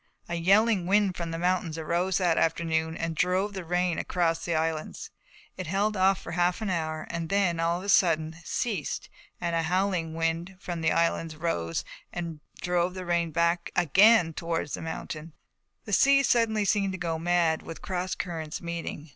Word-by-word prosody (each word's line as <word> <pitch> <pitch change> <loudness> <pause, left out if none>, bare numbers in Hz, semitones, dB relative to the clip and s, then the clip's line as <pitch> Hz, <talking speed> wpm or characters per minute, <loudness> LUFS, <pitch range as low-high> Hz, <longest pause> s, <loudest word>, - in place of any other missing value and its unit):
A - - -5
yelling 195 +2 +3
wind 200 -1 +3
from 170 -1 -4
the 165 - -3
mountains 175 -2 0
arose 175 +3 0
that 175 -3 +2
afternoon 160 0 0
and 165 0 -3
drove 185 +5 +1
the 190 -2 -5
rain 175 0 0
away - - 0
across 170 -2 0
the 170 - -1
islands. 160 -1 -2 0.5
It 185 -2 -5
held 200 +4 0 0.2
for - - -8
half 175 +2 +1
an 215 -3 -2
hour 155 -2 -2
and 165 -1 -4
then 190 -4 +1
of 170 +2 0
a - - -7
sudden 160 -4 +3
ceased 195 - -3 0.3
and 170 -1 -1
a 165 - +2
howling 175 -1 0
wind 165 +3 -1
from 175 -4 -5
the 160 - +2
islands 165 -1 0
rose 85 - -2 0.3
and 170 -3 -5 0.2
drove 180 +1 0
the 185 -1 -5
rain 170 -1 +1
back 170 +2 +1
again 190 +1 +5
towards 165 -2 -3
the - - -3
mountains. 160 0 -6 0.5
The 210 - -5
sea 275 +5 +5
suddenly 225 -4 +2
seemed 195 -1 +1
to - - -4
go 165 -2 -2
mad, 170 -1 +2
with 165 - -9
cross 185 -1 -2
currents 160 -3 -4
meeting. 170 -2 -5
170 Hz, 180 wpm, -27 LUFS, 165-185 Hz, 0.5 s, again